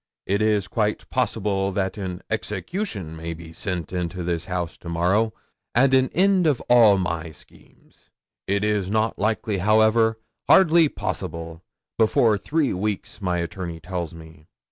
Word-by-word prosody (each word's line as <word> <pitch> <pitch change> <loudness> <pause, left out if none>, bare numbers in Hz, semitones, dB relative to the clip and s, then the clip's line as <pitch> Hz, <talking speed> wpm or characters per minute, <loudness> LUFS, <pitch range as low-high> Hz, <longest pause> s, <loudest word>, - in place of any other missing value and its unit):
It 100 +2 0
is 105 -3 +2
quite 105 0 -1
possible 100 -1 0
that 95 -1 -1
an 95 -3 -5
execution 105 - -4
may 80 +1 -5
be 80 0 -11
sent 90 0 -4
into 90 0 -3
this 85 -1 -2
house 90 -2 -3
to 85 - -8
morrow, 95 +7 +1 0.4
and 135 +3 +4
an 130 0 +4
end 190 -1 +4
of 145 -5 +2
all 115 -5 +6
my 85 -3 -2
schemes. 75 - -22 0.4
It 100 +1 0
is 105 -3 0
not 110 +2 0
likely, 110 -1 0
however 110 +3 +3 0.3
hardly 170 -4 +6
possible 80 -7 -5 0.4
before 110 -1 +3
three 150 +4 0
weeks, 105 +2 -4
my 90 -2 0
attorney 85 -1 -5
tells 90 -1 -4
me. 80 -1 -14
100 Hz, 145 wpm, -23 LUFS, 85-110 Hz, 0.4 s, all